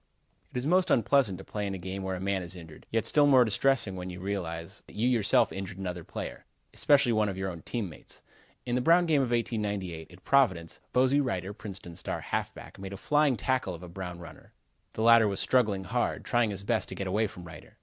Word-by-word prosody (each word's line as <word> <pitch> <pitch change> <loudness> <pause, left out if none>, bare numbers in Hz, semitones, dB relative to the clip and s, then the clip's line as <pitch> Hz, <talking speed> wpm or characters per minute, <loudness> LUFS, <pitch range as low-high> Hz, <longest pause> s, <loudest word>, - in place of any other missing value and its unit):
It - - -5
is 125 - -2
most 180 +4 +3
unpleasant 120 -5 +3
to 95 - -10
play 105 -1 -4
in 95 - -3
a - - -5
game 95 +2 -5
where 95 0 -2
a - - -5
man 95 0 -1
is 90 0 -7
injured. 80 -3 -12
Yet 115 0 0
still 145 -1 +5
more 130 -3 +6
distressing 120 -2 +1
when 90 0 -5
you 90 0 -7
realize 85 -4 -4
that - - -14
you 115 +4 +1
yourself 115 -7 +3
injured 95 -1 -6
another 90 -3 -5
player, - - -7 0.3
especially 140 -4 +4
one 110 -2 +2
of 95 - -5
your 95 0 -2
own 85 -2 -9
team 115 +1 -3
mates. 80 - -12 0.4
In 120 - -2
the 125 - +2
Brown 170 +5 +5
game 155 -4 +3
of 130 - 0
1898, 105 -8 -2
at 90 +2 -16
Providence, 110 - +2
Bosey 130 +3 +3
Reiter, 95 -5 -3
Princeton's 95 -5 -9
star - - -4
halfback, - - -5
made 95 0 -6
a - - -6
flying 145 +1 +2
tackle 120 -5 -1
of 85 - -11
a - - -8
Brown 90 0 -6
runner. 85 -1 -13 0.4
The 110 - -2
latter 115 -1 +7
was 100 -1 -1
struggling 110 -7 +2
hard, 120 +6 -1
trying 120 -2 +2
his 100 -1 -5
best - - 0
to - - -5
get 100 - -4
away 105 +4 +1
from 90 -2 -11
Reiter. 85 - -12
100 Hz, 230 wpm, -29 LUFS, 95-125 Hz, 0.4 s, latter